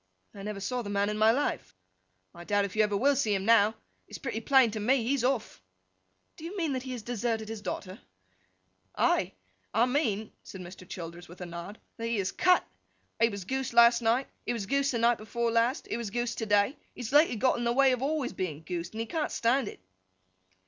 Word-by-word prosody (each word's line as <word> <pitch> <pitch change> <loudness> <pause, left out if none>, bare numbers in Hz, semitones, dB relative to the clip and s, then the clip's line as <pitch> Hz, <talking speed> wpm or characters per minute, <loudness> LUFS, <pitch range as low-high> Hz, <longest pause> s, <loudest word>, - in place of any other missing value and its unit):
'I 200 - -10
never 205 0 -5
saw 245 +6 -2
the 205 - -6
man 200 0 +1
in 210 - -3
my 215 +1 +6
life.' 265 - -1 0.6
'I 175 0 -11
doubt 205 +1 +2
if 200 - -7
you 215 - +4
ever 210 -1 +2
will 280 +6 +3
see 220 -7 +1
him 195 0 -2
now. 220 -1 +5 0.3
It's - - -8
pretty 235 -5 -4
plain 260 -1 +5
to 215 - -4
me, 245 +4 +2
he's 260 +1 0
off.' 250 - -1 0.8
'Do - - -12
you 355 +5 -6
mean 325 -6 0
that 260 - -2
he 260 0 -6
has 240 -4 -6
deserted 225 -1 -2
his 220 -1 -6
daughter?' 190 -2 -5 1.0
'Ay! - - +2 0.4
I 230 +2 +5
mean,' 225 -6 0
said 190 - -10
Mr. 185 0 -11
Childers, 170 0 -8
with 175 - -13
a 180 - -5
nod, 170 +4 -8 0.2
'that 230 0 -3
he 230 -1 0
has 190 -1 -1
cut. 365 -1 +3 0.5
He 230 - +4
was 200 -4 -6
goosed 265 +3 -2
last 235 0 +6
night, 235 +4 +2 0.2
he - - -1
was 225 -4 -3
goosed 275 +6 +1
the - - 0
night 235 0 +3
before 230 +2 -2
last, 230 +4 +1
he - - -3
was 235 -3 -4
goosed 240 +2 -2
to 225 - -3
day. 205 +6 +3 0.2
He - - -8
has 235 - -5
lately 295 -3 +5
got 255 +2 +2
in - - -2
the 235 - +1
way 270 +2 +4
of 250 - 0
being 270 +3 0
always 300 -5 -2
goosed, 170 +1 -4
and 220 - -3
he - - -2
can't 310 +5 -2
stand 240 +1 +1
it. - - -8
230 Hz, 230 wpm, -29 LUFS, 205-255 Hz, 1.0 s, my